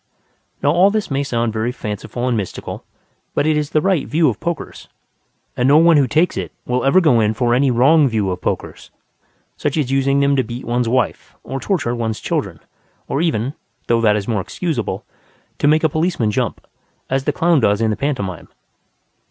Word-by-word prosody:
Now 145 Hz, -, +4 dB
all 180 Hz, +5 st, +5 dB
this 215 Hz, -5 st, -2 dB
may 140 Hz, +1 st, 0 dB
sound 120 Hz, -5 st, -1 dB
very 110 Hz, +2 st, -1 dB
fanciful 120 Hz, +2 st, -5 dB
and 125 Hz, -, +1 dB
mystical, 100 Hz, -5 st, -5 dB, 0.5 s
but -, -, +1 dB
it 155 Hz, 0 st, +2 dB
is 150 Hz, -1 st, -1 dB
the 155 Hz, -, +1 dB
right 185 Hz, -5 st, +1 dB
view 160 Hz, +1 st, +3 dB
of -, -, -4 dB
pokers, 170 Hz, -2 st, -5 dB, 0.7 s
and 125 Hz, -, +1 dB
no 145 Hz, +2 st, +6 dB
one 165 Hz, 0 st, +6 dB
who 140 Hz, -3 st, +3 dB
takes 160 Hz, +8 st, +1 dB
it -, -, -4 dB
will 125 Hz, +1 st, -1 dB
ever 135 Hz, +7 st, +5 dB
go 150 Hz, -10 st, +4 dB
in 110 Hz, 0 st, +1 dB
for 120 Hz, +1 st, +1 dB
any 135 Hz, +2 st, +3 dB
wrong 140 Hz, +5 st, +4 dB
view 105 Hz, -6 st, 0 dB
of 90 Hz, -, -5 dB
pokers, -, -, -4 dB, 0.7 s
such 145 Hz, +1 st, -2 dB
as 140 Hz, -4 st, 0 dB
using 135 Hz, +1 st, +2 dB
them 140 Hz, 0 st, +3 dB
to 130 Hz, -, +2 dB
beat 120 Hz, +2 st, -7 dB
one's 120 Hz, 0 st, 0 dB
wife 125 Hz, 0 st, -1 dB
or 135 Hz, -, -5 dB
torture 150 Hz, -, -1 dB
one's 115 Hz, -2 st, -2 dB
children, -, -, -3 dB, 0.5 s
or 140 Hz, -, -1 dB
even 140 Hz, -6 st, 0 dB, 0.3 s
(though 115 Hz, -1 st, +2 dB
that 105 Hz, -2 st, +4 dB
is 100 Hz, -1 st, -3 dB
more 110 Hz, -5 st, 0 dB
excusable) 115 Hz, -, -3 dB, 0.5 s
to -, -, +2 dB
make 155 Hz, +2 st, +3 dB
a -, -, +5 dB
policeman 155 Hz, -8 st, 0 dB
jump, 120 Hz, -1 st, -2 dB, 0.4 s
as 135 Hz, 0 st, -1 dB
the -, -, +2 dB
clown 170 Hz, -3 st, +2 dB
does 105 Hz, -4 st, +2 dB
in 110 Hz, -1 st, +1 dB
the -, -, -1 dB
pantomime. 100 Hz, -, -3 dB
130 Hz, 200 wpm, -19 LUFS, 115-155 Hz, 0.7 s, no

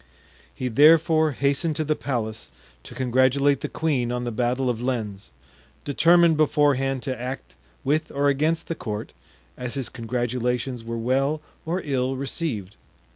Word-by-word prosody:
He 130 Hz, -, -3 dB
therefore 155 Hz, +4 st, +5 dB
hastened 140 Hz, +4 st, +1 dB
to 155 Hz, -, 0 dB
the 155 Hz, 0 st, 0 dB
palace 110 Hz, -, -4 dB, 0.4 s
to -, -, -10 dB
congratulate 130 Hz, +2 st, +2 dB
the -, -, -3 dB
queen 135 Hz, -7 st, 0 dB
on 125 Hz, 0 st, -2 dB
the 120 Hz, -, -2 dB
battle 125 Hz, +3 st, 0 dB
of 120 Hz, -2 st, -1 dB
Lens, 110 Hz, -, -3 dB, 0.5 s
determined 165 Hz, +2 st, +4 dB
beforehand 135 Hz, -3 st, +2 dB
to 130 Hz, -4 st, -3 dB
act 130 Hz, +2 st, -6 dB, 0.3 s
with 155 Hz, +3 st, 0 dB
or 140 Hz, +1 st, +1 dB
against 155 Hz, +4 st, +1 dB
the -, -, -2 dB
court, 110 Hz, -8 st, -5 dB, 0.4 s
as 125 Hz, +1 st, -5 dB
his 135 Hz, -3 st, -3 dB
congratulations 125 Hz, 0 st, -2 dB
were 115 Hz, 0 st, -4 dB
well 135 Hz, +6 st, +1 dB, 0.3 s
or 175 Hz, +3 st, -1 dB
ill 135 Hz, -2 st, 0 dB
received. 130 Hz, -, -4 dB
130 Hz, 145 wpm, -24 LUFS, 120-150 Hz, 0.5 s, therefore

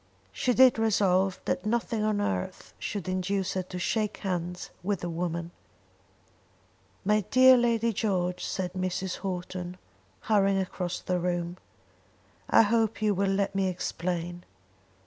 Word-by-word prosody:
She 250 Hz, -2 st, 0 dB
did 255 Hz, -2 st, +6 dB
resolve 195 Hz, -4 st, +2 dB
that -, -, -1 dB
nothing 225 Hz, 0 st, 0 dB
on 215 Hz, -1 st, +1 dB
earth 95 Hz, -, -3 dB
should 200 Hz, -5 st, -4 dB
induce 185 Hz, +1 st, -1 dB
her 185 Hz, -, 0 dB
to 180 Hz, 0 st, -8 dB
shake 210 Hz, +3 st, -1 dB
hands 180 Hz, -2 st, -4 dB
with 195 Hz, 0 st, -1 dB
the 175 Hz, -, -3 dB
woman. 170 Hz, 0 st, -3 dB, 1.5 s
"My 210 Hz, +1 st, +3 dB
dear 260 Hz, 0 st, +8 dB
Lady 230 Hz, -2 st, +2 dB
George," 180 Hz, -4 st, -1 dB
said 180 Hz, -2 st, -3 dB
Mrs. 185 Hz, 0 st, -2 dB
Houghton, 180 Hz, -1 st, -5 dB, 0.4 s
hurrying 195 Hz, -2 st, +3 dB
across 180 Hz, -2 st, -2 dB
the 180 Hz, -1 st, -1 dB
room, 175 Hz, 0 st, -2 dB, 0.9 s
"I -, -, +7 dB
hope 225 Hz, 0 st, +1 dB
you 210 Hz, -1 st, +3 dB
will 195 Hz, +1 st, +1 dB
let 195 Hz, 0 st, 0 dB
me 195 Hz, -1 st, +1 dB
explain." 175 Hz, -1 st, -3 dB
190 Hz, 135 wpm, -28 LUFS, 180-210 Hz, 1.5 s, dear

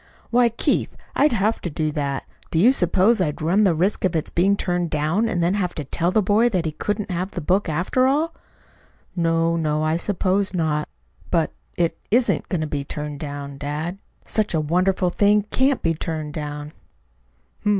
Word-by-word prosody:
"Why, 240 Hz, 0 st, +4 dB
Keith, 230 Hz, -, 0 dB, 0.2 s
I'd 295 Hz, +2 st, +4 dB
have 220 Hz, 0 st, +1 dB
to 175 Hz, -, -3 dB
do 155 Hz, 0 st, -1 dB
that. 140 Hz, -2 st, -2 dB, 0.3 s
Do -, -, -2 dB
you 220 Hz, +10 st, +6 dB
suppose 200 Hz, 0 st, +3 dB
I'd 150 Hz, -4 st, -1 dB
run 185 Hz, +7 st, +3 dB
the 180 Hz, -4 st, +3 dB
risk 185 Hz, +6 st, 0 dB
of 185 Hz, -2 st, +1 dB
its 160 Hz, -, -1 dB
being 195 Hz, +4 st, +3 dB
turned 175 Hz, -2 st, -1 dB
down, 160 Hz, +10 st, +1 dB
and 175 Hz, -5 st, 0 dB
then 175 Hz, +2 st, +2 dB
have 185 Hz, -3 st, -1 dB
to 150 Hz, -, -3 dB
tell 170 Hz, +5 st, -1 dB
that 210 Hz, +3 st, +2 dB
boy 215 Hz, +5 st, +3 dB
that 185 Hz, -6 st, -1 dB
he 160 Hz, -, -1 dB
couldn't 205 Hz, +6 st, -3 dB
have 180 Hz, +2 st, -2 dB
the 190 Hz, -, -5 dB
book, 180 Hz, +3 st, +1 dB
after 180 Hz, +11 st, +1 dB
all?" 305 Hz, +5 st, +1 dB, 0.8 s
"No, 165 Hz, -1 st, +2 dB
no, 155 Hz, -2 st, 0 dB
I 155 Hz, +1 st, +1 dB
suppose 190 Hz, +1 st, 0 dB
not. 155 Hz, -3 st, 0 dB, 0.4 s
But -, -, +1 dB, 0.2 s
it 170 Hz, -1 st, 0 dB
isn't 240 Hz, +3 st, +2 dB
going 180 Hz, -5 st, -1 dB
to -, -, 0 dB
be 145 Hz, -2 st, -3 dB
turned 150 Hz, 0 st, -5 dB
down, 140 Hz, -2 st, -6 dB
dad. 155 Hz, +6 st, -4 dB, 0.3 s
Such 215 Hz, -5 st, 0 dB
a -, -, +2 dB
wonderful 180 Hz, +4 st, +1 dB
thing 205 Hz, +2 st, +3 dB
can't 265 Hz, 0 st, +2 dB
be 165 Hz, -, +2 dB
turned 155 Hz, -2 st, -4 dB
down." 150 Hz, -1 st, -5 dB
175 Hz, 190 wpm, -22 LUFS, 155-205 Hz, 0.8 s, you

